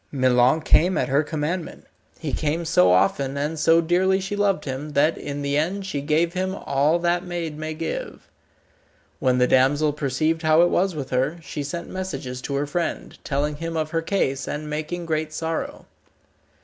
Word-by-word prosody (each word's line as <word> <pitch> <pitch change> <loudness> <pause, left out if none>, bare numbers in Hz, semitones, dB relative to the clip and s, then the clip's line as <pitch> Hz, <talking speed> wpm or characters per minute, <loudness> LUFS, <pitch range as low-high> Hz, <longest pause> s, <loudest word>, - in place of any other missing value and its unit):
Milon 130 +2 +3
came 175 +4 +3
at - - 0
her 140 +2 +3
commandment. 155 +3 -4 0.3
He - - -5
came 160 +3 -1
so 90 - +4
often, 130 +9 +2
and 150 +3 -2
so 165 +1 +5
dearly 185 +3 +2
she 195 +2 -4
loved 200 -5 +1
him, 140 +2 -5
that 150 +3 +3
in 145 0 -5
the 140 0 0
end 190 +6 -1
she 150 -7 -3
gave 160 +4 +1
him 185 +1 -2
all 145 0 +1
that 175 +1 0
maid 170 -4 -4
may 155 +1 -5
give. 165 +1 -5 0.9
When 130 -1 +2
the 125 - +4
damsel 145 +4 +3
perceived 150 +3 0
how 155 +1 +5
it 175 - +4
was 185 -1 +1
with 140 -3 -5
her, 135 +6 0
she 150 - -5
sent 170 +5 -5
messages 135 -9 -5
to 140 - -3
her 140 +1 0
friend, 170 +4 -3
telling 145 +1 -1
him 165 +1 -4
of 155 -1 -2
her 165 0 0
case, 150 -7 -1
and 150 +1 -4
making 155 +3 -4
great 155 -1 -1
sorrow. 160 +1 -4
155 Hz, 185 wpm, -23 LUFS, 140-170 Hz, 0.9 s, so